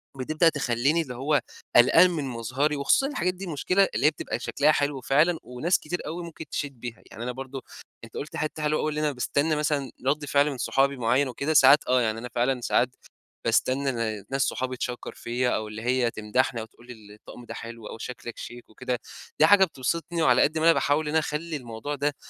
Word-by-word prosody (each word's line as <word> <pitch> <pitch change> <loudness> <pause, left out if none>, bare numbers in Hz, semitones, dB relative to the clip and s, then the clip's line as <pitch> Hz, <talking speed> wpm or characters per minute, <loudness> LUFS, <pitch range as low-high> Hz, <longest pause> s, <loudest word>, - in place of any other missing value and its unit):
بتبدأ 155 +6 +2
تخلّيني 140 +2 +1
اللي 130 -6 -6
هو 145 +4 +1 0.3
قلقان 165 +9 +7
من 165 -4 -2
مظهري، 130 +4 -1
وخصوصًا 145 - +2
الحاجات 185 -11 -1
دي 190 +1 -8
المشكلة 185 +4 +2
اللي - - +1
هي - - +8
بتبقى 155 - -5
شكلها 150 +2 +2
حلو 145 -2 0
فعلًا 155 +6 +2
وناس 125 +9 0
كتير 175 +3 -4
أوي 170 +3 -5
ممكن 165 -1 -9
تشيد 140 -4 -4
بيها، 120 -1 -7
يعني 115 - -7
أنا 125 - -2
برضو 135 +1 -7 0.4
أنت 115 - -12
قُلت 150 - -6
حتّة 155 0 -3
حلوة 150 0 +1
أوي 155 - 0
اللي 150 0 -2
أنا 150 -1 +1
باستنى 140 +4 0
مثلًا 145 -4 -1
رد 145 +2 +1
فعل 145 +1 +2
من 135 - -6
صحابي 135 +3 +1
معين 125 +4 +2
وكده، 140 +4 -2
ساعات 140 0 +6
آه 125 0 +3
يعني 110 -1 -1
أنا 125 +2 -7
فعلًا 125 +1 +1
ساعات 120 +1 +2 0.6
باستنى 135 +1 +1 0.3
ن - - -15
ناس 135 0 -1
صحابي 130 -1 -1
تشَكّر 125 0 -5
فيَّ 120 +2 -2
أو 110 - -3
اللي 105 +1 -7
هي 125 0 +1
تمدحني 115 +3 -1
أو - - -6
تقول 120 +2 -21
لي 125 - -8
ال 105 -3 -16
الطقم 105 +3 -13
ده - - -7
حلو 115 -1 -8
أوي، - - -8
شكلك 120 0 -7
شيك 120 0 -9
وكده، 125 +2 -3 0.4
دي 155 - +7
حاجة 195 +3 +7
بتبسطني، 165 +3 -3
وعلى 130 -5 +5
قدّ 155 - +2
ما 160 - +1
أنا 165 - +7
باحاول 145 +1 +1
إن - - -1
أنا 160 +1 +3
أخلي 155 +2 -3
الموضوع 120 +3 -6
ده 145 +1 -1
140 Hz, 220 wpm, -26 LUFS, 125-155 Hz, 0.6 s, هي